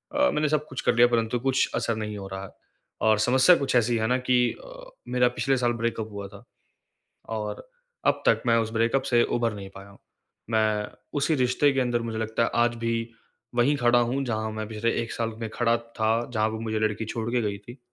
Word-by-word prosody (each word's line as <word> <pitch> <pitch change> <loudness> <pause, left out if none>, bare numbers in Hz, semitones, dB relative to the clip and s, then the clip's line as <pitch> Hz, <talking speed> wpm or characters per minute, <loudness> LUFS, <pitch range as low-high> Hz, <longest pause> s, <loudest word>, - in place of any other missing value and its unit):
अ, 290 0 +4
मैंने 150 0 0
सब 150 0 0
कुछ 130 - -5
कर - - +2
लिया 120 +1 +6
परंतु 115 0 0
कुछ 130 +1 +1
असर 115 - 0
नहीं 105 -1 -4
हो 100 -1 -7
रहा 95 0 -6
है। 100 - -8 0.5
और 110 -1 +3
समस्या 130 +10 +5
कुछ 140 -5 -1
ऐसी 120 0 +3
है 110 0 0
ना 125 +2 +2
कि 125 -1 +5 0.3
अ, - - -12 0.2
मेरा 125 0 +3
पिछले 135 -1 +1
साल 120 -1 +1
ब्रेकअप 110 -2 -2
हुआ 100 -1 -6
था। - - -14 0.9
और 105 - -5 0.4
अब - - +2
तक - - +4
मैं 115 0 +4
उस 110 -1 0
ब्रेकअप 115 +4 +2
से 120 -1 +5
उभर 115 -2 0
नहीं 100 -2 -8
पाया 100 +1 -11
हूँ। 100 - -17 0.5
मैं 110 -2 +1 0.3
उसी 155 +3 +1
रिश्ते 130 +2 +2
के 135 - 0
अंदर 120 -1 0
मुझे 115 -1 -4
लगता 110 +1 -1
है - - +1
आज 120 0 +2
भी, 115 0 -2 0.5
वहीं 125 +5 +3
खड़ा 120 -2 +4
हूँ 125 +3 0
जहाँ 110 -2 -2
मैं 110 0 -5
पिछले 110 +1 -1
1 115 - -5
साल 115 -1 -2
में 115 - -3
खड़ा 115 -1 +2
था, 115 0 -1
जहाँ 110 -1 +2
पे - - -6
वो - - -5
मुझे 110 -1 -2
लड़की 110 +1 -1
छोड़ 115 +1 -4
के 125 0 +1
गई 105 -2 -2
थी। 120 +6 -13
115 Hz, 230 wpm, -26 LUFS, 110-125 Hz, 0.9 s, लिया